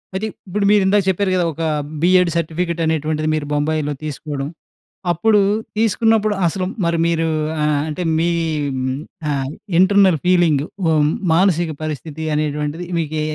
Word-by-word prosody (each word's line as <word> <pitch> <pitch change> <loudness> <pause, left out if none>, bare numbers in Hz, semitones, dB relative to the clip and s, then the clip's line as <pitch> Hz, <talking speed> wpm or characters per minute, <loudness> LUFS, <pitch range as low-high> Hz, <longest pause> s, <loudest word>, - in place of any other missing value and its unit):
అయితే 195 +3 -2 0.2
ఇప్పుడు 200 +2 -1
మీరు 210 -1 +5
ఇందాక 200 +1 +3
జెప్పారు 190 +1 +1
గదా! 180 - +2
ఒక 165 - -7 0.4
బీఎడ్ 180 0 +4
సర్టిఫికెట్ 170 +1 -2
అనేటువంటిది, 155 -1 -1
మీరు 155 -1 -2
బొంబాయిలో 150 0 0
తీసుకోవడం. 145 -1 -4 0.7
అప్పుడు 210 +6 +3 0.4
తీసుకున్నప్పుడు 220 0 +2
అసలు 185 +3 -1 0.2
మరి 170 0 +1
మీరు 165 -1 +1 0.4
ఆహ్, 150 -1 +1
అంటే 155 +3 -4 0.2
మీ 170 - +2 1.0
ఆహ్, 135 -2 -1 0.3
ఇంటర్నల్ 190 -3 +5
ఫీలింగ్ 170 -6 +3 0.2
ఉ - - +3 0.4
మానసిక 170 -2 +2
పరిస్థితి 155 +1 -5
అనేటువంటిది 150 +2 -2
మీకె 155 -1 -2
165 Hz, 130 wpm, -19 LUFS, 150-185 Hz, 1.0 s, మీరు